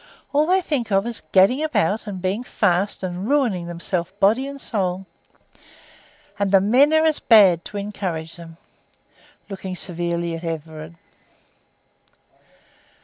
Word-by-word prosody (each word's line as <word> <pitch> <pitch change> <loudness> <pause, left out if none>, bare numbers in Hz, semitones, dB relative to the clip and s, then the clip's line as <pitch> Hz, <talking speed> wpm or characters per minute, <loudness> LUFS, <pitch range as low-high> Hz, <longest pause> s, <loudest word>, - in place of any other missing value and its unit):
All 295 +2 +3
they 375 +1 +3
think 270 - -3
of 195 +1 +2
is 235 -1 -4
gadding 195 +9 +4
about 220 - 0
and 190 -3 -6
being 195 +6 -1
fast, 195 -4 0
and 185 +4 -4
ruining 235 -12 +1
themselves 170 0 -3
body 230 +7 +3
and 280 0 -8
soul. 190 -6 -3 1.3
And 200 -1 0
the 195 - +6
men 250 +10 +4
are 315 0 +3
as 315 -2 +1
bad 195 -7 +5
to 205 - -7
encourage 185 -6 -5
them," 165 -1 -12 0.9
looking 190 -2 -6
severely 170 -1 -3
at 165 - -9
Everard. 160 0 -6
195 Hz, 135 wpm, -21 LUFS, 175-235 Hz, 1.3 s, the